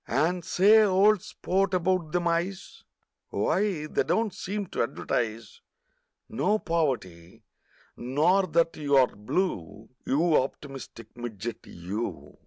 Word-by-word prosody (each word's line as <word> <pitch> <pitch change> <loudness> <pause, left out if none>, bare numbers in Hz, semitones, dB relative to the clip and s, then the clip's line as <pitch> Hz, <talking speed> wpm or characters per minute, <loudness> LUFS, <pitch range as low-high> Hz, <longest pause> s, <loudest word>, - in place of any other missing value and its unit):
And, 175 +2 0
say, 205 +5 +5
old 200 0 +4
sport, 195 0 -1
about 180 -2 0
them 175 0 0
eyes: 175 +4 -3 0.5
Wye, 190 -6 0
they 155 - 0
don't 185 +9 0
seem 200 +2 -4
to - - -2
advertise 115 -1 -3 0.7
No 205 - +1
poverty, 130 - -3 0.5
nor 155 +10 +2
that 165 0 +1
you're 140 -3 +4
blue, 105 - -3
You 160 +3 +2
optimistic 135 -4 -8
midget 120 -2 -6
you! 95 +7 -6
165 Hz, 110 wpm, -27 LUFS, 120-185 Hz, 0.7 s, say